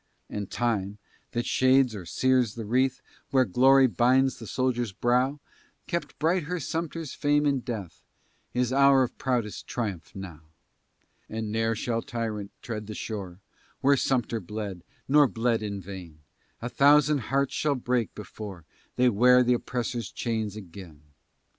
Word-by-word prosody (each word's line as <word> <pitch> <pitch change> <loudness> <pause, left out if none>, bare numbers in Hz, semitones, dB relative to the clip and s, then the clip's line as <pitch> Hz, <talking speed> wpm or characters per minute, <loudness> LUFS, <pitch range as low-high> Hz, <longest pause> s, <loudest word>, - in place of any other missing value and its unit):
And 100 -2 -4
time, 105 -4 -1 0.4
that 120 0 -1
shades 130 -1 +3
or 95 -5 -7
sears 130 0 +2
the 115 -2 -5
wreath, 130 +4 +1 0.3
Where 130 -1 +4
glory 135 +6 +5
binds 130 +2 +3
the 115 - -8
soldier's 120 -3 -1
brow, 125 +7 +1 0.5
Kept 170 - -4
bright 165 +1 +1
her 180 +3 -3
Sumter's 165 0 -4
fame 145 0 +2
in 140 -2 +2
death, 110 - -6 0.5
His 125 0 0
hour 140 -1 +6
of 125 - -4
proudest 120 -5 -2
triumph, 100 -9 -4
now. 90 -5 -8 0.9
And 110 -1 -4
ne'er 115 +1 +1
shall 115 +1 -1
tyrant 110 -4 -4
tread 105 -3 -5
the 110 - -6
shore 95 -4 -6 0.4
Where 140 +1 +5
Sumter 120 -3 0
bled, 100 -2 -6 0.2
nor 145 +1 +6
bled 115 -1 0
in 100 -2 -4
vain; 90 -4 -9 0.5
A - - -1
thousand 145 +2 +5
hearts 140 +1 +1
shall 150 -2 +1
break, 125 -2 -1
before 100 -5 -8 0.3
They 125 - +4
wear 125 +3 +5
the 125 0 +3
oppressor's 120 -2 -3
chains 110 -4 -2
again. 90 -6 -11
120 Hz, 145 wpm, -27 LUFS, 105-130 Hz, 0.9 s, hour